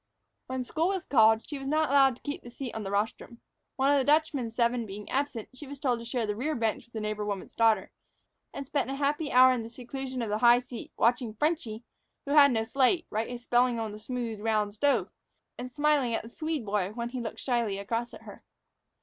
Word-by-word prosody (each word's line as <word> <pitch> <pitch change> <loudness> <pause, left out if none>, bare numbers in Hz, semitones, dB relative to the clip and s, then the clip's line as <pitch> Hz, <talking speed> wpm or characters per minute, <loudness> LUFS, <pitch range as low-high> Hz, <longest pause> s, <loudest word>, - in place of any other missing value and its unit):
When 260 0 -3
school 320 +7 0
was 380 -2 -2
called, 220 -3 +4
she 290 - -5
was 270 - -6
not 310 0 +1
allowed 270 -2 +5
to - - -23
keep 290 - -4
the 240 - -11
seat 245 0 -6
on 220 - -4
the 195 - -4
rostrum. 215 +3 -2 0.4
One 275 0 +3
of 285 - +4
the - - +1
Dutchman's 285 -6 +1
seven 235 -1 +1
being 205 +1 -8
absent, 275 -5 -2
she 280 +3 -10
was 285 +1 -8
told 250 -4 0
to 230 - -9
share 235 -1 -1
the 210 -1 -2
rear 295 +8 -2
bench 225 -1 -1
with 235 - -31
the 220 - -3
neighbor 215 0 -3
woman's 200 -2 -4
daughter, 225 -1 +2 0.6
and 280 - -6
spent 280 0 -1
a 270 - -2
happy 290 +2 -1
hour 255 +1 +7
in 245 - -2
the 225 - -7
seclusion 255 +1 -5
of 225 - -3
the 210 +1 -1
high 240 +1 +6
seat, 245 -1 -9
watching 235 -1 +1
"Frenchy," 245 -6 -1 0.4
who 280 - -4
had 285 -2 +7
no 225 -2 +1
slate, 270 +9 +2
write 220 +2 -2
his 245 -1 -7
spelling 245 -1 +2
on 220 -2 -3
the 210 - -9
smooth, 230 -1 -4
round 210 -1 0
stove, 285 +6 +2 0.5
and 250 +1 -6
smiling 290 -4 +2
at - - -3
the 225 - -10
Swede 310 -6 -3
boy 200 -1 -1
when 235 +1 -4
he 250 0 -5
looked 225 - -6
slyly 235 -6 0
across 230 +4 -3
at - - -12
her. - - -12
245 Hz, 235 wpm, -29 LUFS, 225-275 Hz, 0.6 s, hour